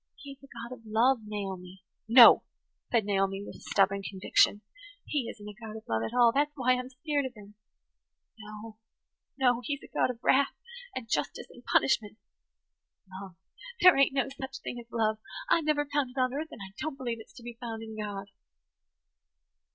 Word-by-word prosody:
He 285 Hz, -4 st, -11 dB
is 275 Hz, -, -13 dB
a 275 Hz, -, -15 dB
God 235 Hz, 0 st, -8 dB
of 235 Hz, -, -20 dB
love, 230 Hz, +4 st, +3 dB
Naomi." 190 Hz, -3 st, -6 dB, 0.2 s
"No," 235 Hz, +1 st, +9 dB, 0.5 s
said 230 Hz, -4 st, +2 dB
Naomi 195 Hz, -1 st, 0 dB
with -, -, -11 dB
stubborn 195 Hz, 0 st, +2 dB
conviction. 195 Hz, +1 st, +2 dB, 0.4 s
"He 280 Hz, -6 st, -2 dB
isn't 205 Hz, -1 st, -10 dB
a 210 Hz, -, -7 dB
God 220 Hz, +1 st, -9 dB
of 220 Hz, -, -13 dB
love 110 Hz, 0 st, 0 dB
at 115 Hz, -, -3 dB
all. 240 Hz, -2 st, +5 dB
That's 290 Hz, +1 st, +2 dB
why 255 Hz, -3 st, +2 dB
I'm 250 Hz, 0 st, -3 dB
skeered 285 Hz, +2 st, -2 dB
of 250 Hz, -, -13 dB
him. 205 Hz, -1 st, -14 dB, 0.9 s
No, 215 Hz, +1 st, -10 dB, 0.6 s
no. 250 Hz, -3 st, +3 dB
He's 285 Hz, +3 st, -4 dB
a -, -, -11 dB
God -, -, +2 dB
of 250 Hz, -, -4 dB
wrath 275 Hz, +1 st, +3 dB, 0.4 s
and 255 Hz, -3 st, -5 dB
justice 150 Hz, -9 st, -2 dB
and 245 Hz, -, -15 dB
punishment. 215 Hz, -5 st, +1 dB, 0.9 s
Love! 190 Hz, -1 st, -9 dB, 0.4 s
There 365 Hz, 0 st, +8 dB
ain't 275 Hz, 0 st, +4 dB
no 270 Hz, 0 st, +1 dB
such 270 Hz, 0 st, -7 dB
thing 245 Hz, -, -5 dB
as 235 Hz, 0 st, -13 dB
love! 220 Hz, -1 st, 0 dB, 0.3 s
I've 330 Hz, -8 st, +3 dB
never 295 Hz, -1 st, +1 dB
found 285 Hz, -2 st, -1 dB
it 255 Hz, +2 st, -6 dB
on 255 Hz, 0 st, +1 dB
earth, 305 Hz, +3 st, -3 dB
and 220 Hz, -, -11 dB
I 190 Hz, -, -18 dB
don't 305 Hz, -3 st, -4 dB
believe 240 Hz, -4 st, -4 dB
it's 220 Hz, -, -14 dB
to 240 Hz, -, -13 dB
be 235 Hz, -1 st, -9 dB
found 225 Hz, -2 st, -5 dB
in 220 Hz, -1 st, -8 dB
God." 200 Hz, -2 st, -6 dB
235 Hz, 190 wpm, -29 LUFS, 210-265 Hz, 0.9 s, No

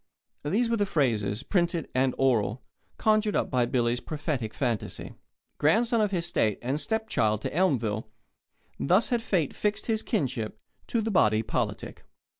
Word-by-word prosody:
these 205 Hz, +11 st, +1 dB
were 230 Hz, 0 st, +1 dB
the 205 Hz, -, +2 dB
phrases, 115 Hz, -, 0 dB
printed 170 Hz, -2 st, 0 dB
and 130 Hz, 0 st, +1 dB
oral, 120 Hz, -3 st, +1 dB, 0.3 s
conjured 215 Hz, -1 st, +2 dB
up -, -, 0 dB
by 125 Hz, -2 st, +2 dB
Billy's 120 Hz, -1 st, +1 dB
prophetic 145 Hz, -8 st, -3 dB
fancy. 120 Hz, -2 st, -3 dB, 0.5 s
Grandson 225 Hz, -, +3 dB
of 210 Hz, -, +2 dB
his 175 Hz, -3 st, -1 dB
State, 110 Hz, -, +1 dB
and 135 Hz, +5 st, -1 dB
stepchild 145 Hz, -, 0 dB
to -, -, -3 dB
Elmville 115 Hz, -, +1 dB, 0.7 s
thus 185 Hz, -, +3 dB
had 240 Hz, -2 st, +1 dB
fate 175 Hz, -10 st, 0 dB
fixed 210 Hz, 0 st, -1 dB
his 220 Hz, -2 st, 0 dB
kinship 125 Hz, -, -2 dB, 0.3 s
to 230 Hz, -, 0 dB
the 220 Hz, +1 st, -1 dB
body 110 Hz, -, +3 dB
politic. 110 Hz, -, -3 dB
145 Hz, 150 wpm, -27 LUFS, -, 0.7 s, Grandson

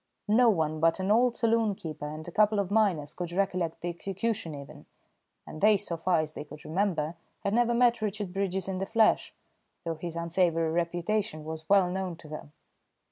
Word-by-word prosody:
No 235 Hz, +3 st, +5 dB
one 155 Hz, -6 st, 0 dB
but 165 Hz, +3 st, +3 dB
an 190 Hz, +2 st, 0 dB
old 240 Hz, +2 st, +4 dB
saloon 225 Hz, -3 st, +2 dB
keeper 155 Hz, -4 st, -6 dB
and 155 Hz, +2 st, -7 dB
a -, -, -6 dB
couple 215 Hz, +2 st, +3 dB
of 200 Hz, -1 st, -1 dB
miners 185 Hz, -9 st, +2 dB
could 175 Hz, -1 st, -5 dB
recollect 180 Hz, -3 st, -1 dB
the 175 Hz, -, -2 dB
execution 195 Hz, 0 st, -3 dB
even, 140 Hz, -1 st, -11 dB, 0.6 s
and 155 Hz, -, -9 dB
they, 210 Hz, 0 st, +6 dB
so 175 Hz, -, -4 dB
far 165 Hz, 0 st, +2 dB
as 155 Hz, 0 st, -5 dB
they -, -, -6 dB
could 150 Hz, 0 st, -13 dB
remember, 165 Hz, -2 st, 0 dB, 0.3 s
had 200 Hz, -, 0 dB
never 235 Hz, 0 st, +3 dB
met 240 Hz, -1 st, +3 dB
Richard 205 Hz, -3 st, -3 dB
Bridges 190 Hz, -1 st, -1 dB
in 190 Hz, -1 st, -3 dB
the 195 Hz, -, -2 dB
flesh, 225 Hz, -1 st, +3 dB, 0.5 s
though 165 Hz, -, -2 dB
his 165 Hz, +1 st, -6 dB
unsavoury 170 Hz, -1 st, +1 dB
reputation 175 Hz, +1 st, -1 dB
was 160 Hz, 0 st, -7 dB
well 195 Hz, -2 st, +5 dB
known 185 Hz, -1 st, -3 dB
to 160 Hz, -, -14 dB
them. 150 Hz, -1 st, -8 dB
180 Hz, 190 wpm, -29 LUFS, 160-210 Hz, 0.6 s, they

